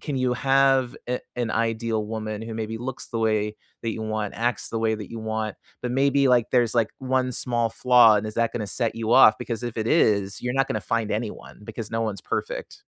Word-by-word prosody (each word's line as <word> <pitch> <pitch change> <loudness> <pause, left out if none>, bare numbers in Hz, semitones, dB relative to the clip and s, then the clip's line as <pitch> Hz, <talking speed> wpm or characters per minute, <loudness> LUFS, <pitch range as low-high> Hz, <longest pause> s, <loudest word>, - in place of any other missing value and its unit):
can 145 -3 -4
you 130 -1 +1
have 135 -1 +2
a 125 - -1 0.2
an 120 -2 -1
ideal 115 -1 -1
woman 110 -1 -4
who 115 0 -6
maybe 110 0 -4
looks 130 +1 -6
the 115 - -3
way 110 -1 0 0.3
that 115 - -1
you 110 - -5
want, 110 -2 -3
acts 120 -1 -1
the 115 - -2
way 110 0 +1
that 105 -3 -8
you 115 - -6
want, 110 -1 -3 0.3
but 125 - -2
maybe, 140 +1 +3
like, 120 -2 +3
there's, 120 -2 +2
like, 115 -2 +2
1 130 -1 0
small 120 -1 0
flaw, 120 -3 +6
and 105 - -1
is 110 - -6
that 115 -1 +1
gonna 110 -3 -3
set 115 +2 -1
you 115 0 -1
off? 125 -4 +8
Because 115 -1 -4
if 120 -2 -5
it 110 -1 -2
is, 100 -9 +2
you're 125 0 -1
not 135 -1 +2
gonna 110 - -2
find 115 +3 -1
anyone 105 -1 -5
because 110 0 -6
no 115 - 0
one's 110 -3 -2
perfect. - - -5
115 Hz, 225 wpm, -24 LUFS, 110-125 Hz, 0.3 s, off